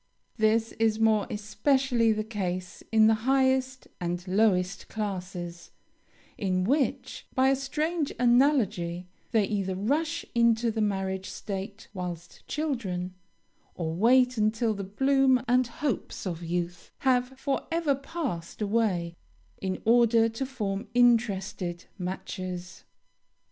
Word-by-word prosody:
This 220 +1 +2
is 220 -1 +2
more 220 -2 +3
especially 235 +2 +1
the 215 0 0
case 185 -5 -4
in 220 -1 +6
the 220 - +6 0.2
highest 260 -1 +2
and 175 +1 -3
lowest 195 -1 +1
classes, 180 -4 -5 0.7
in 185 -2 0
which, 265 +2 -1
by 260 +1 +4
a 270 - +4
strange 300 +3 -1
analogy, 235 - +2 0.2
they 220 -3 +3
either 195 -2 -2
rush 305 - -1
into 235 0 +3
the 220 0 -2
marriage 190 -2 -1
state 200 +2 -6
whilst 175 -3 -7
children, 200 - -2 0.6
or 160 -2 -3
wait 250 +6 +4
until 220 +1 +1
the 200 -1 -5
bloom 265 +5 +3
and 250 0 +3
hopes 250 -1 -3
of 175 -3 -3
youth 175 +1 -3
have 255 0 +1
forever 290 +3 0
passed 275 - -5
away, 200 -6 0 0.5
in 190 -1 -3
order 230 0 +5
to 230 +4 -4
form 210 -5 -3
interested 205 -7 +2
matches. 185 -1 -5
220 Hz, 115 wpm, -28 LUFS, 185-255 Hz, 0.7 s, in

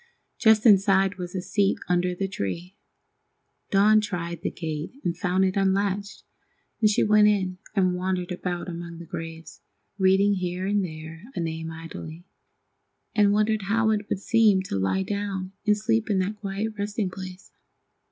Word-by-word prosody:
Just 220 -1 +5
inside 195 -2 +5
was 180 +1 -6
a 185 - -2
seat 200 0 +1
under 180 0 +1
the 195 +2 -2
tree. 180 - -5 0.9
Dawn 210 +2 +5
tried 170 -5 -4
the - - -1
gate 155 +1 -5
and 175 -3 -1
found 185 +1 +1
it 185 - 0
unlatched, 200 +1 0 0.6
and 215 - +5
she 210 - +2
went 210 0 +5
in 185 -3 +1 0.2
and 185 -2 +3
wandered 180 0 -2
about 180 0 -3
among 170 -1 -6
the 170 - -9
graves, 165 0 -8 0.4
reading 190 +2 +4
here 180 -1 -2
and 205 0 +1
there 160 +1 -8
a - - -2
name 160 -1 -3
idly, 165 +1 -8 0.9
and 205 -2 +4
wondering 215 +1 +2
how 220 +3 +1
it 210 -1 -2
would - - 0
seem 210 -3 +3
to 185 - -4
lie 95 - +1
down 195 -1 -3 0.2
and 210 0 +4
sleep 225 +1 0
in 200 - +2
that 195 +3 -1
quiet 205 +2 -3
resting 205 -1 -2
place. 185 0 -9
190 Hz, 160 wpm, -25 LUFS, 175-205 Hz, 0.9 s, Just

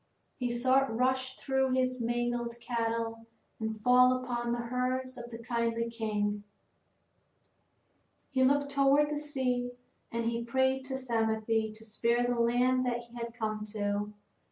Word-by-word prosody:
He 250 -1 0
saw 255 +2 +3
it 270 - 0
rush 260 +3 0
through 265 -1 +1
his 255 -1 +1
own 230 - 0
mangled 240 0 -1
cattle 230 -1 -2 0.3
and 220 -1 -3
fall 250 +1 +6
upon 240 -1 -2
the 240 - 0
herds 255 +2 -1
of 240 -1 -8
the 230 - -7
kindly 230 0 -1
king. 210 -2 -1 1.9
He 260 -2 +3
looked 285 +2 +3
toward 280 +2 +4
the 295 - -1
sea 255 -4 -1 0.4
and 230 0 -2
he 235 0 -1
prayed 260 +2 +1
to 265 0 -3
Psamathe 225 -4 0 0.3
to 220 +1 -10
spare 235 +2 +1
the 245 -1 0
land 250 +2 +3
that 240 -1 -1
he 235 0 -17
had 235 0 -5
come 215 -2 -2
to. 205 0 -1
240 Hz, 155 wpm, -31 LUFS, 230-255 Hz, 1.9 s, fall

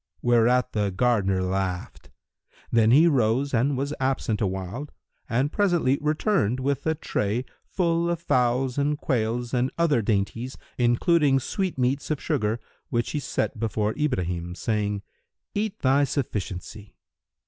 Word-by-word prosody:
Whereat 120 +1 +3
the 105 -2 +1
gardener 95 -2 +1
laughed. 90 -1 -3 0.6
Then 115 -1 +4
he 145 +8 +7
rose 135 -1 +2
and 130 +3 +2
was 140 +2 -2
absent 130 -5 0
awhile 95 +8 -3 0.4
and 130 +5 +1
presently 175 -10 +2
returned 150 - +1
with 140 +2 -1
a 160 - +2
tray, 115 -4 -2 0.2
full 170 -2 +1
of 170 -1 -1
fowls 125 -3 +1
and 145 +1 +1
quails 120 -2 -1
and 125 +1 +2
other 160 -8 +3
dainties 110 +5 -1 0.2
including 135 +4 +3
sweet 185 +6 -2
meats 130 +2 0
of 155 -2 0
sugar, 115 -7 -1 0.3
which 120 -1 -1
he 150 - -1
set 130 -4 -2
before 110 -1 0
Ibrahim, 90 - -2
saying, 105 -2 -1 0.5
"Eat 210 0 -2
thy 140 +2 +4
sufficiency." 105 -6 -4
125 Hz, 135 wpm, -25 LUFS, 110-145 Hz, 0.6 s, he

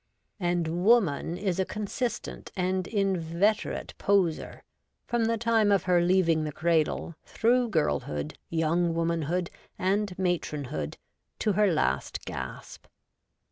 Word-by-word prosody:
And 175 -1 0
Woman 185 -7 +3
is 190 -2 -1
a - - +4
consistent 215 +5 -4
and 185 -1 0
inveterate 195 0 0
poseur, 190 -5 +1 0.4
from 240 -1 0
the 230 0 +1
time 225 -2 +3
of 195 -3 +3
her 180 -1 +3
leaving 175 -3 +3
the 155 - -3
cradle, 165 +1 0
through 240 +1 +2
girlhood, 75 - -1
young 165 +1 +1
womanhood, 170 +1 -1 0.3
and 195 0 0
matron 175 -5 -1
hood, 75 -1 -4 0.4
to 215 - +1
her 205 0 +3
last 155 - -1
gasp. - - -7
180 Hz, 120 wpm, -28 LUFS, 165-205 Hz, 0.4 s, a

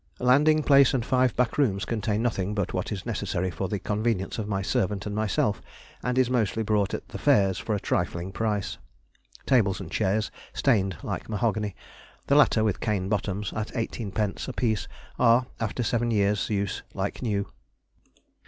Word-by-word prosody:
Landing 150 +5 +4
place 140 -2 +6
and 120 -3 -1
five 130 -2 +2
back 125 +3 0
rooms 100 -9 +2
contain 110 0 -1
nothing 105 -4 -1
but 100 -3 -1
what 90 - -2
is 95 -3 -4
necessary 95 -5 -2
for 95 +2 -3
the 105 - -1
convenience 105 0 -1
of 105 - -3
my 100 -2 -1
servant 100 +1 0
and 105 - -3
myself; 105 -1 0 0.4
and 125 0 -1
is 130 -1 +4
mostly 115 -3 0
bought 105 -2 +1
at - - -8
the - - -7
fairs, 95 -2 +3
for 105 +1 -1
a - - -1
trifling 90 0 -2
price. 105 -1 -2 0.7
(Tables 110 -8 +3
and 90 -4 -8
chairs 105 +2 0 0.2
stained 100 - +1
like - - -4
mahogany, 105 -2 -1 0.5
the 140 - +3
latter 130 -6 +5
with 105 -3 0
cane 100 -3 -1
bottoms, 105 -1 -2
at 110 0 -2
18d. 110 -3 -2
a 130 - -4
piece, 110 -6 0 0.3
are, 120 +2 +5
after 115 +2 -2
seven 120 +1 0
years' 105 -2 +1
use, 100 -2 -1
like 95 +1 -3
new.) 105 -5 0
105 Hz, 170 wpm, -26 LUFS, 100-115 Hz, 0.7 s, place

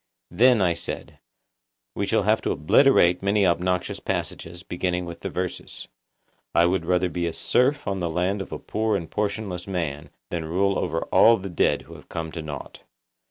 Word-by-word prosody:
Then, 115 +3 +5
I 85 -2 +3
said, 85 - -6 0.8
we - - -1
shall - - +2
have - - +2
to - - -2
obliterate 90 - +4
many 100 +1 +2
obnoxious 90 +1 0
passages, 85 +1 -4
beginning 90 +1 -2
with 85 -1 -8
the - - -4
verses, 90 0 -5 0.7
'I 85 - +6
would 90 -1 0
rather 90 0 +2
be 85 -1 -2
a 85 - -3
serf 140 - +1
on 95 -1 -1
the 85 -2 -1
land 90 +5 0
of - - -8
a - - -3
poor 110 0 -1
and 85 - -6
portionless 105 -3 -3
man 80 -6 -3 0.2
than 85 -2 -2
rule 95 +4 +1
over 80 -1 -1
all 115 0 +6
the 95 0 -7
dead 85 - +1
who - - -13
have - - -14
come 80 -1 -4
to 80 - -5
nought. 75 -2 -8
90 Hz, 185 wpm, -24 LUFS, 85-100 Hz, 0.8 s, I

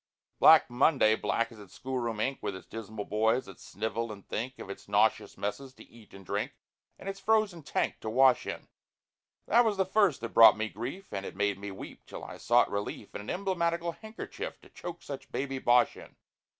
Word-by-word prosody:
Black - - +8
Monday—black 120 -3 +2
as 115 - -13
its 100 -3 -14
school 130 0 -3
room 115 -3 -3
ink— 135 +5 -1
With 100 -2 -3
its 95 - -10
dismal 110 -2 -7
boys 110 +4 +1
that 95 - -12
snivel 110 +3 -4
and 100 -2 -11
think 130 +4 -4
Of - - -8
its 100 - -9
nauseous - - +2
messes 130 +6 -4
to - - -13
eat 115 -3 -18
and 95 -1 -13
drink, 105 +8 -2 0.4
And - - -11
its 195 0 -4
frozen 210 -4 +1
tank - - -1
to 110 - -5
wash 130 +2 +4
in. - - -5 0.8
That 235 +2 +5
was 215 -3 0
the 190 - +2
first 190 - +2
that 115 - -4
brought 115 -1 +8
me 110 0 -2
grief, 130 - -7
And 95 -1 -5
made 100 -1 0
me 100 0 -6
weep, 95 - -10
till - - -8
I - - -8
sought - - +3
relief 100 +1 -4
In - - -5
an 105 - -9
emblematical 170 -3 -1
handkerchief, 220 +6 -7
To - - -17
choke 175 -1 -8
such 140 -2 -8
baby 135 -1 -3
bosh 120 -1 +4
in. - - -13
120 Hz, 200 wpm, -30 LUFS, 105-170 Hz, 0.8 s, Black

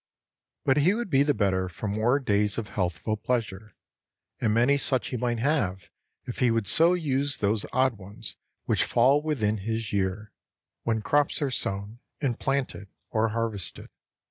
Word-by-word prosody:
But 135 - +3
he 170 +8 +4
would 235 -5 -4
be 135 -1 +5
the 145 0 +2
better 95 -3 +1
for 100 +5 -6
more 110 +6 +2
days 105 -5 +1
of 110 -2 -4
healthful 90 +3 -1
pleasure, 110 -4 -3 0.6
and 110 - +1
many 120 +6 +4
such 135 -2 0
he - - -3
might 120 0 -1
have 110 - -1 0.3
if 120 - -6
he 125 - +4
would 115 -2 +1
so 165 - +4
use 145 -4 0
those 105 +1 0
odd 130 -4 +2
ones 100 +3 -8 0.3
which - - +2
fall 135 +5 +4
within 115 -9 0
his 110 +2 -3
year, 100 +1 -1 0.5
when 110 -2 -1
crops 145 +5 +2
are 140 - 0
sown 105 -2 -2 0.2
and 130 -6 -1
planted 135 -7 -2 0.2
or 110 0 +2
harvested. 110 -4 -3
115 Hz, 165 wpm, -27 LUFS, 105-135 Hz, 0.6 s, be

